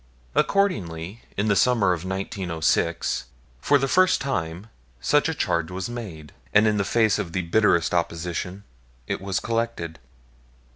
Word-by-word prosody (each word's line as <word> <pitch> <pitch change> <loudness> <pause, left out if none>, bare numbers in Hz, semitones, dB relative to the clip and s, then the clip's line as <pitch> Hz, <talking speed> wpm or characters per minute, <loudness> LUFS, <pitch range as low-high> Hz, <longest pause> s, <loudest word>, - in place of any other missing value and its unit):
Accordingly, 110 - 0 0.2
in 100 +2 +1
the 105 - +3
summer 115 -3 +3
of 85 -1 -4
1906, 90 - -1 0.3
for 145 - +4
the 135 0 0
first 185 +6 +4
time, 90 -9 -3 0.3
such - - +2
a - - -2
charge 85 -1 0
was 95 +3 -4
made; 85 - -7 0.2
and, 105 +1 +7
in 105 -1 +2
the 100 - +2
face 110 +1 +2
of 85 - -4
the 95 - 0
bitterest 85 -1 +3
opposition, 85 +2 -2 0.4
it - - -3
was 95 -1 -1
collected. 115 - -2
95 Hz, 145 wpm, -24 LUFS, 85-115 Hz, 0.4 s, and